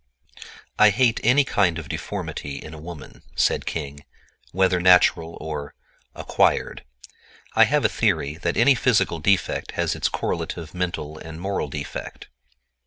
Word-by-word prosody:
"I 105 - +8
hate 115 +2 +2
any 130 +5 +5
kind 95 -10 +1
of 80 -3 -7
deformity 70 +1 -5
in 80 +3 -9
a 80 - -9
woman," 80 -2 -10
said - - +1
King, 70 -2 -5 0.5
"whether 95 0 +2
natural 90 -2 +4
or—acquired. 75 -2 -2 0.7
I - - +6
have - - +1
a - - +7
theory 70 +1 0
that 85 0 -2
any 130 +4 +6
physical 115 -9 +1
defect 95 +3 0
has - - 0
its - - -1
correlative 80 -2 -4
mental 85 -4 -4
and 80 0 -9
moral 95 -3 -2
defect." 70 0 -7
85 Hz, 135 wpm, -23 LUFS, 75-95 Hz, 0.7 s, I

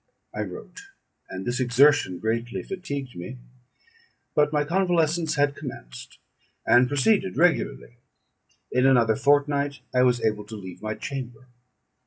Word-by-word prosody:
I - - -3
wrote, 410 - -8 0.5
and 95 0 -6
this 120 +1 -1
exertion 130 -5 +4
greatly 115 +4 -2
fatigued 140 - -6
me; 90 +9 -7 1.0
but 150 0 +3
my 150 -1 +1
convalescence 170 -1 +1
had 145 -1 +1
commenced, 125 -2 -9 0.5
and 120 +1 +5
proceeded 190 - +1
regularly. 165 -7 +1 0.7
In 125 +1 +3
another 120 -4 +4
fortnight 145 +1 +1
I 125 - +3
was 125 -1 +3
able 105 -1 -1
to 110 - -9
leave 95 -4 -9
my 110 0 -3
chamber. 125 0 -7
130 Hz, 130 wpm, -25 LUFS, 120-150 Hz, 1.0 s, and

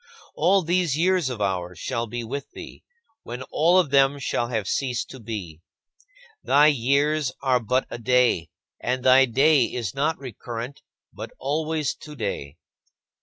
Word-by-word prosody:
All 185 +4 +3
these 170 -3 +1
years 180 -3 +2
of 120 -4 -5
ours 90 -3 -2
shall 120 -3 -3
be 120 +2 -5
with 135 +5 -6
thee, - - -10 0.4
when 125 +2 -7
all 170 +4 +4
of 170 -7 +2
them 140 0 +4
shall 120 -3 -1
have 110 -5 -3
ceased 125 -1 -2
to 130 - -10
be. 100 -9 -7 0.8
Thy 145 +2 +5
years 140 +2 +1
are 130 -2 +3
but 125 +3 0
a - - -5
day, 120 -8 +2 0.3
and 125 +1 -2
thy 130 +1 +6
day 135 +2 +4
is 115 -5 -4
not 150 +4 0
recurrent, 120 0 -7 0.3
but - - -7
always 155 +1 -1
today. 100 - -6
130 Hz, 150 wpm, -24 LUFS, 115-150 Hz, 0.8 s, thy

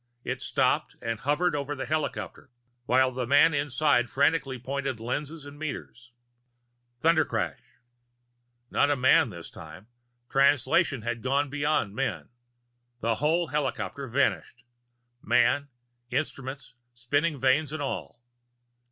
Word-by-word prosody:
It - - -3
stopped - - +1
and 115 -1 -3
hovered 150 +4 +1
over 145 0 -3
the 135 -1 -4
helicopter, 155 -3 -3 0.4
while 130 +1 +4
the 125 -1 -3
man 145 +4 +5
inside 140 -3 +2
frantically 140 -2 +1
pointed 135 0 -3
lenses 145 +6 -4
and 145 0 -11
meters 120 -6 -7 0.9
Thundercrash. 165 -1 +2 1.1
Not 145 - +3
a 145 - +3
man 130 -1 +4
this 85 -4 -9
time 90 - -11 0.4
Translation 135 0 +3
had 120 0 -3
gone 140 +2 0
beyond 145 -8 0
men. 130 -2 -3 0.7
The 115 0 +1
whole 165 +2 +2
helicopter 140 -1 -2
vanished, 125 -1 0 0.6
man, 145 0 +2 0.4
instruments, 135 -1 -4 0.2
spinning 145 +5 0
vanes 135 +3 +2
and 155 -1 -3
all. 120 -3 -5
140 Hz, 115 wpm, -27 LUFS, 125-145 Hz, 1.1 s, man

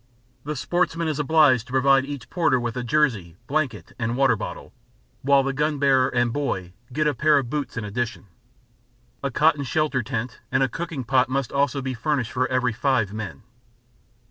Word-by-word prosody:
The 150 +1 -3
sportsman 170 +3 0
is 155 -2 -2
obliged 145 -4 +4
to - - -12
provide 135 0 +4
each 140 -3 -8
porter 160 -7 +2
with 120 -1 -3
a 125 - -3
jersey, 115 - 0
blanket 130 - -2
and 115 +1 -1
water 135 -4 +4
bottle, - - -7 0.5
while 140 0 +4
the 135 0 -1
gun 150 +2 0
bearer 135 -2 +3
and 120 -2 0
"boy" 95 -11 -2 0.2
get 155 +4 0
a 150 - +2
pair 155 0 +3
of 130 -3 -1
boots 145 -4 -3
in 115 - -2
addition. 110 +2 -3 1.0
A 140 - -1
cotton 150 +2 +2
shelter 145 -1 0
tent 120 +1 -4
and 130 +1 +3
a - - +3
cooking 165 0 -5
pot 130 +1 +2
must 135 -1 -1
also 140 -1 0
be 130 0 -2
furnished 125 0 -1
for 130 0 0
every 125 -2 0
five 115 -5 0
men. 110 -5 -6
130 Hz, 185 wpm, -24 LUFS, 120-145 Hz, 1.0 s, obliged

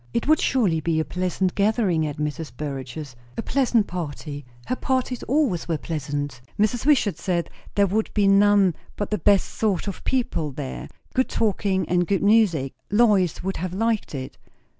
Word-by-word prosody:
It 235 - 0
would 310 0 +5
surely 200 -11 +2
be 160 0 0
a 160 - 0
pleasant 185 0 -1
gathering 200 -6 +2
at 145 - -5
Mrs. 150 0 -3
Burrage's, 140 -1 -6 0.2
a - - -2
pleasant 245 -6 +2
party; 150 -5 -5 0.2
her - - -1
parties 255 -1 -1
always 260 - +1
were 165 -2 0
pleasant, 145 -4 -4 0.2
Mrs. 225 +5 +1
Wishart 260 -10 +3
said; 175 -3 -1 0.2
there 200 - +4
would 215 +3 -1
be 205 -2 +4
none 200 -2 +5 0.2
but 205 - -4
the 210 - 0
best 200 +3 +3
sort 205 -4 -1
of 200 - -5
people 170 - -1
there, 135 -1 -6 0.3
good 260 0 +1
talking 200 -3 0
and 175 -1 +1
good 195 -1 +1
music; 200 -11 +3 0.2
Lois 205 -7 +3
would 190 +1 -2
have 180 +1 -4
liked 225 -5 0
it. 130 -1 -6
190 Hz, 170 wpm, -24 LUFS, 155-215 Hz, 0.3 s, would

